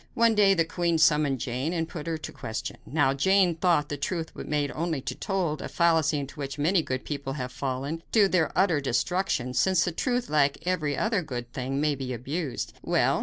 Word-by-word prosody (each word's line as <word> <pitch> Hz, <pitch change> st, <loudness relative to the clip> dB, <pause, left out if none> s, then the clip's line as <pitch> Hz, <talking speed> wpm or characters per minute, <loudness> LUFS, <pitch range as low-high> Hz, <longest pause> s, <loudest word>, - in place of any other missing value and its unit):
One 230 Hz, -1 st, +4 dB
day 200 Hz, -2 st, +5 dB
the 165 Hz, -2 st, +2 dB
queen 170 Hz, 0 st, 0 dB
summoned 150 Hz, -3 st, +3 dB
Jane 130 Hz, +8 st, -2 dB
and 165 Hz, -2 st, -1 dB
put 165 Hz, -2 st, -7 dB
her 165 Hz, -1 st, -1 dB
to 155 Hz, -, -7 dB
the -, -, -20 dB
question. 110 Hz, +2 st, -5 dB
Now, 145 Hz, -3 st, +2 dB
Jane 190 Hz, +5 st, +3 dB
thought 165 Hz, -3 st, +1 dB
the 145 Hz, -, -3 dB
truth 165 Hz, +3 st, -3 dB
was -, -, -8 dB
made 145 Hz, -1 st, 0 dB
only 165 Hz, -2 st, -2 dB
to -, -, -4 dB
be -, -, -19 dB
told, 180 Hz, -7 st, -1 dB
a -, -, -5 dB
fallacy 160 Hz, -3 st, +2 dB
into 140 Hz, +1 st, -6 dB
which 140 Hz, -1 st, -4 dB
many 165 Hz, +5 st, +3 dB
good 130 Hz, -4 st, -4 dB
people 140 Hz, -2 st, -4 dB
have 125 Hz, -3 st, -4 dB
fallen, 135 Hz, +5 st, -3 dB
to 210 Hz, -3 st, +5 dB
their 180 Hz, -5 st, +1 dB
utter 180 Hz, -6 st, +3 dB
destruction; 130 Hz, 0 st, 0 dB
since 185 Hz, +4 st, +3 dB
the 175 Hz, -, -1 dB
truth, 245 Hz, +8 st, -1 dB
like 145 Hz, -2 st, +2 dB
every 160 Hz, -6 st, 0 dB
other 215 Hz, -3 st, +1 dB
good 120 Hz, -6 st, -6 dB
thing, 135 Hz, +1 st, -2 dB
may 150 Hz, 0 st, +2 dB
be 130 Hz, -2 st, -4 dB
abused. 135 Hz, +4 st, -4 dB
Well! -, -, +2 dB
155 Hz, 220 wpm, -27 LUFS, 140-175 Hz, -, day